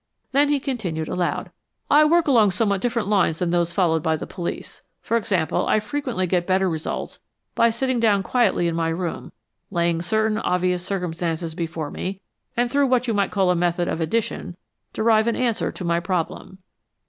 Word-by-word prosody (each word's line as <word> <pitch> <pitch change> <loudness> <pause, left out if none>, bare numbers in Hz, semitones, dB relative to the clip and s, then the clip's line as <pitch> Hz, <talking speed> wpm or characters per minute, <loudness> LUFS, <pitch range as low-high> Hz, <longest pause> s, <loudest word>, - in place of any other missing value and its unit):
Then 285 +2 +3
he 290 -1 +2
continued 195 - -3
aloud, 175 -1 -2 0.4
"I 300 +1 +6
work 335 +1 +3
along 230 -7 +5
somewhat 200 0 0
different 230 -4 -1
lines 195 -6 +2
than 175 -1 -1
those 175 -1 +1
followed 170 -3 +2
by 160 0 +1
the - - -5
police. 175 -1 -6 0.2
For 230 - -2
example, 190 -8 0
I - - +3
frequently 235 -3 -2
get 175 -1 0
better 190 0 +2
results 160 -3 -4 0.3
by 230 - +4
sitting 250 +2 -1
down 205 -4 +3
quietly 210 -7 +2
in 170 - -1
my 165 0 0
room, 170 +1 -4 0.4
laying 170 -2 0
certain 220 +3 +1
obvious 180 -2 0
circumstances 170 -3 -3
before 160 -2 -4
me, 190 +1 -4 0.4
and, 240 0 +1
through 280 0 +3
what 250 -1 +2
you 230 - +1
might 200 -1 +1
call 190 -3 +2
a - - +2
method 175 0 0
of 165 - -2
addition, 180 -1 -2 0.3
derive 220 0 +3
an 235 - +1
answer 235 -3 0
to 180 - -7
my 170 0 +2
problem." 180 +1 -3
190 Hz, 185 wpm, -23 LUFS, 170-230 Hz, 0.4 s, I